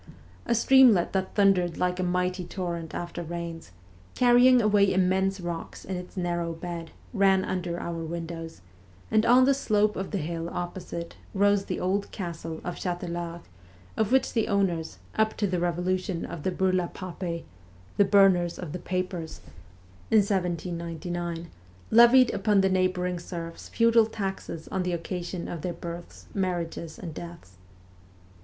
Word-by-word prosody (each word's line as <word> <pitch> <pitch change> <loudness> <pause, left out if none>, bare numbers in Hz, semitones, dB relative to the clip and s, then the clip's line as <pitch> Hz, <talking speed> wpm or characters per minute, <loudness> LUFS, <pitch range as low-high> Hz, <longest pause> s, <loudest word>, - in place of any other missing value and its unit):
A - - +2
streamlet 235 -6 +5
that 190 -1 -2
thundered 185 -4 +3
like 180 0 0
a - - +1
mighty 180 +1 0
torrent 170 -3 -5
after 175 0 -4
rains, 170 - -6 0.5
carrying 250 +1 +6
away 205 -3 +4
immense 190 +1 +2
rocks 175 -2 -6
in 190 - -4
its 180 +1 -8
narrow 175 -2 -1
bed, 165 0 -6 0.2
ran 195 -3 +3
under 175 -2 -3
our 170 -1 -4
windows, 165 - -6 0.5
and 215 0 +3
on 250 +2 +7
the 275 - +5
slope 210 -5 +1
of 190 0 -4
the 205 - -2
hill 165 0 -3
opposite 175 -1 -5 0.2
rose 200 0 +3
the - - -3
old 195 +2 -1
castle 165 -3 -5
of 175 - -5
Chatelard, 175 -1 -4 0.5
of 220 0 0
which 265 0 +3
the 225 -2 +1
owners, 180 -5 0 0.2
up 220 0 +2
to 210 - +1
the 185 -2 0
revolu 175 +2 0
tion 180 -3 -4
of 165 - -7
the 185 - -1
burla 185 -1 +1
papei 175 -2 -5 0.5
(the 200 - +6
burners 195 -4 +4
of 175 -5 -6
the 180 - -5
papers) 180 -3 -3 0.7
in 220 - +5
1799, 175 -3 -2 0.4
levied 240 +3 +7
upon 200 0 +3
the 190 - +3
neighbouring 185 -1 0
serfs 170 -1 -7
feudal 230 -1 +4
taxes 195 -6 -5
on 190 - -1
the 180 -1 -1
occasion 175 +1 -4
of 170 - -5
their 175 +1 -3
births, 170 0 -8
marriages, 170 -4 -3
and 170 -4 -7
deaths. 170 - -10
180 Hz, 150 wpm, -27 LUFS, 170-195 Hz, 0.7 s, on